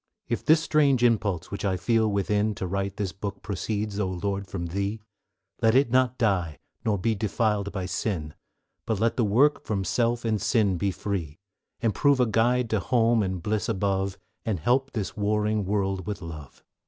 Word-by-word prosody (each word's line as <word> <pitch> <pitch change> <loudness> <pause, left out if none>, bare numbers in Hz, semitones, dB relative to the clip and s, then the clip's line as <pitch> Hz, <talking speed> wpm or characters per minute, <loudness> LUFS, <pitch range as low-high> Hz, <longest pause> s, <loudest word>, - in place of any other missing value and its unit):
If 120 - -2
this 160 +1 +4
strange 140 -6 +3
impulse 100 -7 +1
which 100 - -5
I 95 -2 +1
feel 110 +4 +2
within 105 +1 +1
To 95 - -4
write 100 +2 -2
this 100 -3 -2
book 100 +1 -6
proceeds, 105 +1 -3
O 100 - +1
Lord, 100 +2 -3
from 90 -2 -4
Thee, 100 +5 -2 0.6
Let 115 +1 +4
it 135 -3 +4
not 130 0 +3
die, 90 - +1 0.3
nor 105 -2 +1
be 110 +4 +1
defiled 105 -1 0
by 95 -1 -3
sin, 90 -4 -3 0.5
But 110 -3 0
let 115 +1 +2
the 120 - +1
work 125 +9 +3
from 100 -3 -2
self 115 +5 0
and 110 -3 0
sin 105 -4 +2
be 100 - +1
free, 90 -4 -4 0.4
And 115 -4 +1
prove 140 -2 +3
a 125 - +5
guide 120 +2 +2
to 110 - +2
home 115 0 +2
and 95 -3 -2
bliss 105 +1 -1
above, 95 -2 0 0.3
And 105 -6 -1
help 130 - +2
to - - -28
fill 115 - -1
this 95 - -6
warring 105 0 +1
world 95 -2 -1
with 100 -3 -4
love. 75 -4 -9
105 Hz, 190 wpm, -26 LUFS, 95-115 Hz, 0.6 s, a